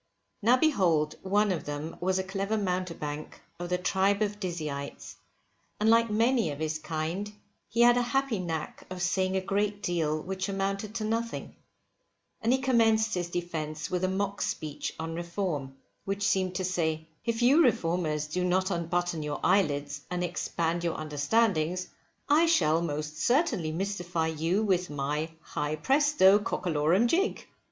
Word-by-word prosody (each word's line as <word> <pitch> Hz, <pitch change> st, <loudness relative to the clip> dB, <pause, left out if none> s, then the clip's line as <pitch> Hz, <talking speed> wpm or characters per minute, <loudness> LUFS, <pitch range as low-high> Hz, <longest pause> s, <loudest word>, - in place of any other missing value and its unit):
Now 235 Hz, +4 st, +5 dB
behold 175 Hz, -, +2 dB
one 205 Hz, +2 st, +2 dB
of 175 Hz, -, -3 dB
them 145 Hz, +2 st, -5 dB
was 185 Hz, +1 st, +1 dB
a 190 Hz, -, 0 dB
clever 195 Hz, +3 st, -2 dB
mountebank 180 Hz, -6 st, -3 dB, 0.2 s
of 175 Hz, 0 st, -4 dB
the 180 Hz, -, +1 dB
tribe 195 Hz, +3 st, +2 dB
of 205 Hz, 0 st, -3 dB
Dizzyites, 155 Hz, -7 st, -5 dB, 0.6 s
and 215 Hz, +1 st, +4 dB
like 230 Hz, 0 st, +4 dB
many 230 Hz, -2 st, +2 dB
of 145 Hz, -, -5 dB
his 155 Hz, 0 st, -2 dB
kind 165 Hz, +6 st, -3 dB, 0.4 s
he 235 Hz, -, +1 dB
had 240 Hz, 0 st, +7 dB
a -, -, +3 dB
happy 255 Hz, -2 st, 0 dB
knack 165 Hz, -4 st, -4 dB
of 185 Hz, 0 st, -6 dB
saying 185 Hz, +1 st, +1 dB
a -, -, 0 dB
great 205 Hz, +2 st, -1 dB
deal 160 Hz, -4 st, 0 dB
which 190 Hz, +4 st, -4 dB
amounted 195 Hz, +2 st, -2 dB
to 225 Hz, -, -2 dB
nothing; 230 Hz, +2 st, -3 dB, 0.9 s
and 230 Hz, -, +2 dB
he 260 Hz, -, +4 dB
commenced 225 Hz, -4 st, +3 dB
his 175 Hz, -1 st, -2 dB
defence 160 Hz, -3 st, -4 dB
with 180 Hz, 0 st, -1 dB
a -, -, +3 dB
mock 200 Hz, +1 st, -2 dB
speech 150 Hz, -1 st, -3 dB
on 160 Hz, 0 st, -4 dB
Reform, 170 Hz, -5 st, -3 dB, 0.3 s
which 200 Hz, +1 st, -1 dB
seemed 185 Hz, -1 st, +1 dB
to 185 Hz, -, -1 dB
say: 160 Hz, -3 st, -1 dB, 0.2 s
If 230 Hz, 0 st, -1 dB
you 275 Hz, +7 st, +6 dB
Reformers 165 Hz, -, +1 dB
do 180 Hz, +4 st, -2 dB
not 185 Hz, +2 st, +1 dB
unbutton 175 Hz, -1 st, -1 dB
your 150 Hz, -1 st, -3 dB
eyelids, 145 Hz, -6 st, +1 dB
and 180 Hz, 0 st, -2 dB
expand 170 Hz, -1 st, -1 dB
your 170 Hz, -1 st, -1 dB
understandings, 165 Hz, +3 st, +1 dB, 0.4 s
I 315 Hz, +4 st, +5 dB
shall 165 Hz, -, +3 dB
most 150 Hz, -1 st, -3 dB
certainly 240 Hz, -, +2 dB
mystify 175 Hz, -2 st, -2 dB
you 165 Hz, +6 st, 0 dB
with 185 Hz, -3 st, +1 dB
my 150 Hz, +2 st, -2 dB
high 150 Hz, +1 st, -2 dB
presto, 265 Hz, -, +4 dB
cockalorum 175 Hz, +1 st, +1 dB
jig! 375 Hz, -, 0 dB
180 Hz, 160 wpm, -29 LUFS, 160-210 Hz, 0.9 s, had